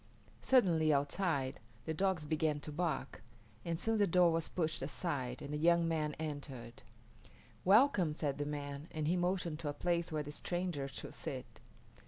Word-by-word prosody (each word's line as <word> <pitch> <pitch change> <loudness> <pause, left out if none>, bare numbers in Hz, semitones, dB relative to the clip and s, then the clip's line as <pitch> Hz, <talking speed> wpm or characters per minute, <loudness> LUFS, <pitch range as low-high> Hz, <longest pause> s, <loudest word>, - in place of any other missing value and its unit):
Suddenly, 170 -12 +4
outside, 145 -1 0 0.3
the 160 - -1
dogs 185 -2 +1
began 155 0 +1
to 150 - -7
bark, 150 -7 -2 0.4
and 165 -1 -2
soon 225 +1 +1
the 205 - +4
door 175 0 +5
was 165 -1 +1
pushed 160 -3 -1
aside 135 -3 -3
and 145 - -5
a - - 0
young 170 +2 +4
man 155 -2 0
entered. 135 -6 -6 0.8
"Welcome," 195 - +5
said 145 -3 -2
the 145 - -1
man, 145 0 -5
and 155 -1 -2
he 175 - +3
motioned 175 -3 0
to 155 -3 -3
a - - -2
place 170 +1 0
where 155 -1 -1
the 145 - -7
stranger 175 -2 -2
should 135 - -7
sit. - - -7
155 Hz, 170 wpm, -35 LUFS, 145-175 Hz, 0.8 s, door